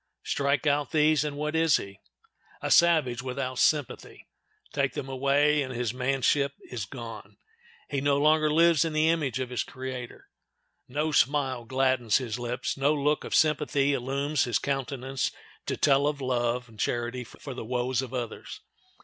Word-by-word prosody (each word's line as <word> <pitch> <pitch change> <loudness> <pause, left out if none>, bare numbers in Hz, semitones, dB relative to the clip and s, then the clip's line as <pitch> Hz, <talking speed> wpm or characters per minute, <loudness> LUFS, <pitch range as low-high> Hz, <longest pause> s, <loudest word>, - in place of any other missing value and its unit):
Strike 140 +1 0
out 145 -1 +1
these 155 -1 +3
and 145 -1 -4
what 150 +1 -2
is 160 -2 +4
he? 100 0 -9 0.6
A - - -3
savage 155 -8 +4
without 130 0 -4
sympathy! 150 -5 0 0.5
Take - - 0
them - - -5
away, 140 +3 +2
and 130 -2 -3
his 120 -2 -2
manship 135 +2 +1 0.2
is 115 -5 -4
gone; 115 +2 -9 0.5
he 140 -2 -2
no 140 0 +2
longer 155 +1 +3
lives 165 -1 +4
in 165 -1 -2
the 155 +1 +3
image 150 -7 0
of 130 -1 -4
his 125 - -1
Creator. 130 -2 -7 0.6
No 150 +4 -1
smile 135 -4 +1
gladdens 130 -2 +2
his 125 -3 -4
lips, 120 +1 -3
no 140 +3 +2
look 150 +1 0
of - - -2
sympathy 145 -2 +2
illumes 140 +2 0
his 120 -3 +1
countenance 135 -1 -2 0.4
to - - -2
tell 140 0 +3
of 150 -1 -2
love 125 -1 -1
and 110 -2 -18
charity 120 +3 -2
for 135 +3 -10
the 125 - -6
woes 125 +2 -1
of 130 -2 -7
others. 120 -3 -6
135 Hz, 165 wpm, -27 LUFS, 125-145 Hz, 0.6 s, is